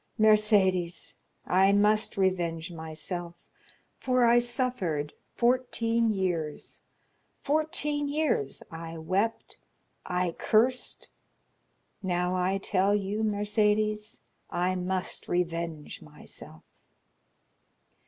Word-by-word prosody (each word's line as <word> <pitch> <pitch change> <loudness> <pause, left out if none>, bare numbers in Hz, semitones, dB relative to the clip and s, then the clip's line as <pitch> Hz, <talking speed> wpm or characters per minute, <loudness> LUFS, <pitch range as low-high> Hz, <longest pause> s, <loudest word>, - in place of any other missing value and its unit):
Mercédès, 205 -5 +3 0.3
I 190 +2 +4
must 210 +1 +3
revenge 175 -3 0
myself, 170 +2 -6 0.6
for 255 -2 +2
I 235 +1 +6
suffered 240 - -1 0.2
fourteen 235 -2 +2
years,—fourteen 285 - -3
years 285 - -1
I 165 0 -7
wept, 190 +8 -2 0.4
I 180 -1 -1
cursed; 240 +8 +1 0.9
now 180 -1 0
I 185 +2 +1
tell 195 +1 +1
you, 205 +1 -2
Mercédès, 210 0 0 0.3
I 180 +1 0
must 185 0 -3
revenge 170 -3 -2
myself." 80 - -10
195 Hz, 80 wpm, -28 LUFS, 175-225 Hz, 0.9 s, I